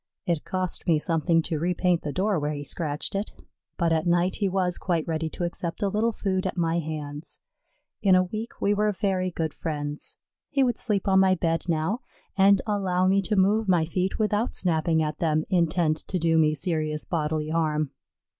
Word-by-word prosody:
It 170 -5 0
cost 185 -2 -3
me 165 -3 +4
something 165 +1 +1
to 155 -1 -2
repaint 175 +1 +1
the 150 - -4
door 190 +2 0
where 150 +1 -2
he 145 - -5
scratched 150 0 -2
it, 200 +2 -3 0.4
but 170 -2 +2
at 160 +2 0
night 175 +2 +2
he 200 -2 0
was 180 -2 0
quite 170 -4 -1
ready 160 -1 -1
to 175 - -5
accept 170 +1 -3
a 200 - +2
little 215 +4 +1
food 190 -3 -1
at 185 - -5
my 165 0 +1
hands. 150 -1 -6 0.6
In 190 -3 +5
a 185 - +5
week 215 +5 -6
we 205 - +2
were 210 +1 +2
very 190 -2 -1
good 160 -3 -3
friends. 145 -2 -3 0.3
He 275 -1 +2
would 245 -3 +1
sleep 205 -5 0
on 190 -1 +5
my 190 -1 +4
bed 165 0 -1
now 165 +8 0 0.4
and 195 0 +5
allow 190 -4 +1
me 195 +1 +3
to 210 +2 -1
move 205 +2 +2
my 175 -3 +3
feet 185 +3 -1
without 215 +1 0
snapping 160 -2 +2
at 150 0 -3
them, 155 -2 +1
intent 170 -3 +2
to 185 - -4
do 165 -1 +2
me 155 -1 +3
serious 155 -2 -1
bodily 155 -2 -1
harm. 155 -3 0
175 Hz, 195 wpm, -26 LUFS, 160-190 Hz, 0.6 s, In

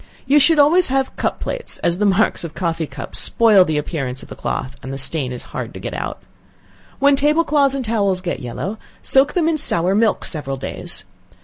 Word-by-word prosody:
You 280 +3 +5
should 315 +3 +5
always 320 +5 +5
have 270 0 -1
cup - - -2
plates, - - -3
as 175 +1 +1
the 210 - +3
marks 200 0 +2
of 170 - -4
a - - -24
coffee 165 -3 -2
cup 140 0 -8
spoils 210 -5 +4
the 155 -1 0
appearance 135 -4 -3
of - - -15
a - - -6
cloth, 130 +1 -4
and 130 - -7
the 135 - -4
stain 135 -1 -1
is 125 - -6
hard - - -5
to - - -7
get - - -6
out. - - -5 0.7
When 280 0 +4
table 300 +4 +2
cloths 285 -3 +2
and 265 -2 -3
towels 200 -4 +1
get 180 -1 -4
yellow, 165 - -5 0.2
soak 270 +2 +5
them 340 -3 +1
in 320 -2 +1
sour 180 -6 +2
milk 220 +2 +1
several 135 -4 -5
days. - - -4
200 Hz, 215 wpm, -19 LUFS, -, 0.7 s, You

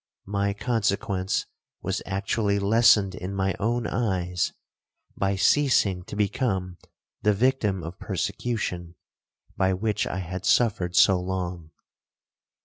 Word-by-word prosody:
My 100 0 -1
consequence 100 -4 -1 0.4
was - - -2
actually 100 +2 0
lessened 105 -1 +4
in 95 +1 -5
my 95 0 0
own 120 +2 0
eyes, 90 -6 -1 0.6
by 100 0 0
ceasing 100 -5 +3
to - - -8
become 95 -4 -1 0.4
the 105 - +3
victim 105 -5 +1
of 85 +4 -8
persecution, 95 -3 -3 0.6
by 95 0 +2
which 105 +2 -1
I - - -3
had 95 0 -5
suffered 95 -5 +2
so 95 -2 +6
long. 90 -3 -4
100 Hz, 115 wpm, -26 LUFS, 90-105 Hz, 0.6 s, so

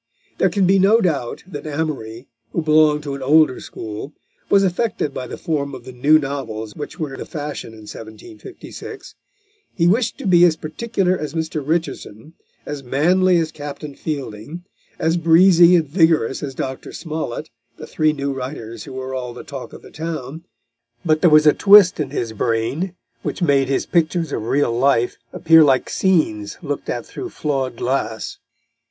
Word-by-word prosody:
There 190 - +4
can 195 -1 +1
be 195 +2 +4
no 205 +4 +5
doubt 150 - -1
that 155 -5 -8
Amory, 140 -6 -4 0.3
who 170 - -1
belonged 155 -1 +4
to 140 -2 -4
an 140 - -6
older 145 0 +4
school, 110 +7 -7 0.4
was 200 0 +5
affected 190 -3 -1
by 130 - -5
the - - -7
form 145 -5 -2
of 125 - -10
the 130 - -8
new 140 +5 +4
novels 135 -7 -5
which 150 +2 -7
were 145 -4 -4
the - - -6
fashion 145 -6 -6
in 110 - -13
1756. 340 - -10 0.6
He 170 - +1
wished 225 +5 +1
to - - -8
be 175 -2 +5
as 170 -3 +5
particular 185 +4 -1
as 155 -2 -5
Mr. 160 -1 -2
Richardson, 155 -4 -3 0.3
as 145 -1 -5
manly 175 +8 +3
as 160 -1 0
Captain 145 -1 -7
Fielding, 145 +1 -6 0.3
as 165 +2 +1
breezy 170 +1 +6
and 165 -3 +2
vigorous 160 -5 +2
as 135 -3 -5
Dr. 130 0 -5
Smollett, 155 -7 -5 0.3
the - - -8
three 155 0 +1
new 140 -2 -3
writers 125 -4 -7
who - - -9
were 130 0 -5
all 125 -2 -5
the - - -9
talk 135 -3 -8
of - - -12
the - - -14
town. 160 -1 -6 0.6
But 155 -1 +2
there 175 - +6
was 155 0 +6
a 150 - +7
twist 200 -4 +6
in 145 -3 -1
his 120 -5 -3
brain 120 - -1 0.3
which - - -3
made 140 -4 +3
his 135 - 0
pictures 165 -2 0
of 110 - -3
real 135 -4 +1
life 120 -1 +2
appear 160 -1 +5
like 135 -3 +2
scenes 150 - 0
looked 145 -2 -4
at 120 -1 -3
through 370 - -7
flawed 135 - -2
glass. 115 -4 -2
150 Hz, 175 wpm, -20 LUFS, 130-170 Hz, 0.6 s, a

